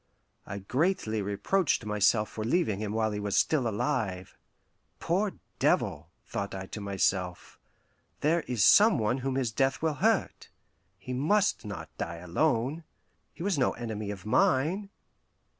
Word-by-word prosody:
I 100 - -5
greatly 125 - 0
reproached 105 - 0
myself 105 +1 +2
for 110 - -5
leaving 115 - +1
him 105 -1 -3
while 110 0 0
he 105 - -3
was 100 -1 -1
still 140 -6 +2
alive. 100 -5 -2 0.6
"Poor 190 +4 0 0.3
devil," - - +1 0.2
thought 100 -1 -4
I 95 0 -5
to 105 - -7
myself, 95 -2 -1 0.6
"there 165 +3 +2
is 120 -5 +2
some 215 -4 +7
one 115 +3 0
whom 130 0 -2
his 130 -4 0
death 135 +4 +1
will 160 -1 +2
hurt. - - +1 0.5
He 125 +6 -7
must 185 - +1
not 100 -2 -7
die 85 0 -3
alone. 125 - 0 0.5
He - - -9
was 190 -6 0
no 125 - +2
enemy 110 -3 -5
of 100 -2 -7
mine." 150 - +2
115 Hz, 145 wpm, -29 LUFS, 100-150 Hz, 0.6 s, some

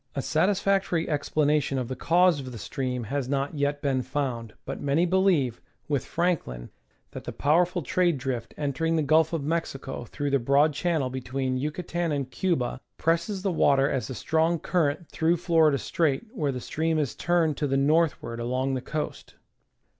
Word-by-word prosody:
A 140 - -1
satisfactory 190 0 +1
explanation 150 -2 +1
of 125 -2 -2
the 130 - -4
cause 175 +2 +3
of 130 -2 -7
the 120 - -7
stream 125 +5 -3
has 130 +3 -3
not 140 +1 -1
yet 145 0 -1
been 135 -2 +1
found, 125 -4 -3
but - - -5
many 145 +5 +2
believe, 180 - +2 0.3
with 145 -4 -1
Franklin, 160 - -1 0.4
that - - -8
the - - -4
power 165 +5 +3
ful 180 -1 -4
trade 175 +3 +2
drift 125 -3 -4
entering 150 +3 0
the 160 - +2
Gulf 155 +2 +4
of 165 -4 -2
Mexico 140 -5 -3
through 145 +3 -3
the 140 - +3
broad 140 +5 +3
channel 150 -4 0
between 130 0 -2
Yucatan 170 +3 -2
and 140 -3 -2
Cuba 135 -6 -1 0.2
presses 170 +4 0
the 195 - +1
water 140 -4 +3
as 135 -5 -2
a 130 - -5
strong 160 +4 +1
current 160 -1 0
through 165 +2 +1
Florida 160 -4 +3
Strait, 155 - 0
where 150 - -1
the 125 - -4
stream 160 +4 -1
is 145 -6 0
turned 170 -3 +1
to 145 - 0
the 135 0 +1
northward 140 -5 +1
along 130 +3 -1
the 130 - -2
coast. 150 +3 -5
145 Hz, 175 wpm, -26 LUFS, 135-165 Hz, 0.4 s, Gulf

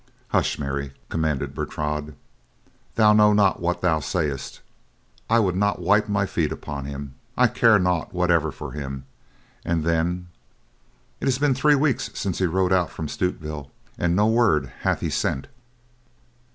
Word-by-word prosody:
"Hush, - - +1
Mary!" 70 -1 -3 0.2
commanded 80 -4 -1
Bertrade. 75 0 -3 0.8
"Thou 105 -1 +6
know 105 0 +6
not 100 -2 +3
what 90 +1 -1
thou 85 -3 +2
sayest. 75 -2 -3 0.7
I 115 - +4
would 95 -6 +2
not 100 +1 +1
wipe 105 +1 +2
my 100 -1 +1
feet 80 -5 -1
upon 70 -2 -5
him, 70 -1 -6 0.2
I - - +5
care 115 -2 +5
naught 90 -1 0
whatever 85 -4 +2
for - - -8
him, 70 -2 -6 0.6
and 85 -2 0
then—it 85 - -5
has 130 -2 +2
been 145 0 +2
three 145 +3 +4
weeks 140 -2 +1
since 95 -4 -2
he 95 - +2
rode 95 +2 +1
out 90 -3 +2
from 80 - -5
Stutevill 75 -5 -3 0.3
and 85 0 0
no 105 +2 +4
word 110 - +2
hath - - 0
he - - -2
sent." 65 - -1
85 Hz, 150 wpm, -24 LUFS, 75-105 Hz, 0.8 s, Thou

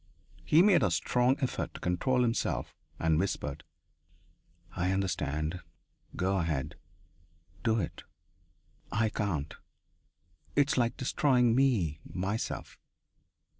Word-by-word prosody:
He 160 +4 +5
made 200 -3 +5
a - - +3
strong 125 +2 +2
effort 130 - -2
to - - -7
control 125 +9 +1
himself 115 -1 -1 0.2
and 80 -1 +2
whispered: 75 -5 -2 1.1
"I 90 0 0
understand. 85 -3 -1 0.6
Go 95 +2 +1
ahead. 80 -7 -1 0.9
Do 115 -1 +2
it. 85 - -4 0.9
I 110 +1 +2
can't. 85 -9 -2 1.0
It 145 0 +3
is - - 0
like 120 -1 +1
destroying 125 -2 +3
me 110 - +2
myself.... 95 +5 -4
100 Hz, 105 wpm, -30 LUFS, 85-125 Hz, 1.1 s, He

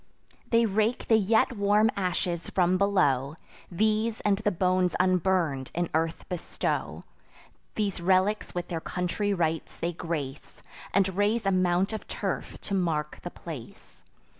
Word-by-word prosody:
They 230 0 +4
rake 220 +3 0
the 225 - +7
yet 220 +4 +3
warm 210 +2 +3
ashes 180 -2 -2
from 180 -1 +2
below; 145 -9 +2 0.3
These, 215 +4 +1
and 200 -1 +2
the 210 - +1
bones 185 -1 +1
unburn'd, 180 -7 +1
in 175 0 -1
earth 160 +1 -1
bestow; 180 -2 -3 0.7
These 200 -4 -1
relics 190 +4 +2
with 175 0 -3
their 165 -2 -3
country 180 +5 -2
rites 165 -4 -1
they 170 +1 -2
grace, 150 -5 -5 0.3
And 190 -1 +2
raise 205 +2 +1
a 195 - +3
mount 185 +2 +2
of 220 - -6
turf - - -4
to 200 - -6
mark 160 -5 -1
the 175 - -5
place. 150 -10 -10
185 Hz, 140 wpm, -28 LUFS, 170-205 Hz, 0.7 s, the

